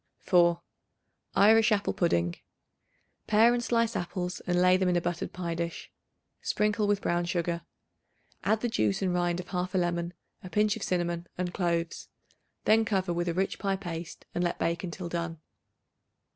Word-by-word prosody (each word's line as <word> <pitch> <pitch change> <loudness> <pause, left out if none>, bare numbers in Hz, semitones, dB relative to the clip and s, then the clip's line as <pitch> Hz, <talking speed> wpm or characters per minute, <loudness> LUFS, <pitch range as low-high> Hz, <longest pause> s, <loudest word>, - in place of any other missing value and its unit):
4. 170 -2 +3 0.8
Irish 220 +2 +6
Apple 205 -1 +1
Pudding. 85 - +1 0.9
Pare 225 +3 +5
and 240 0 0
slice 230 -1 +1
apples 180 0 -3
and 175 0 +2
lay 180 0 +6
them 185 -1 +2
in 180 - +2
a - - +4
buttered 175 0 -3
pie 175 -2 -3
dish. 170 0 -4 0.5
Sprinkle 210 0 +1
with 205 -1 +1
brown 175 0 +1
sugar; 170 -1 -1 0.8
add 220 0 +2
the 240 - +1
juice 110 - 0
and 185 -2 +1
rind 175 0 +1
of 180 - -7
1/2 180 -1 -1
of 180 +1 -6
a - - +4
lemon, 175 -1 -1 0.3
a 185 - -7
pinch 210 +1 +2
of - - -8
cinnamon 175 -1 -1
and 180 0 -2
cloves. 170 -2 -1 0.6
Then 225 +1 +5
cover 190 -5 0
with 175 +1 -1
a 165 - -2
rich 190 +1 -1
pie 195 -1 0
paste 170 -3 -7
and 175 - 0
let 175 - 0
bake 170 +1 -1
until 175 0 -5
done. 170 -1 -3
180 Hz, 175 wpm, -29 LUFS, 170-200 Hz, 0.9 s, Irish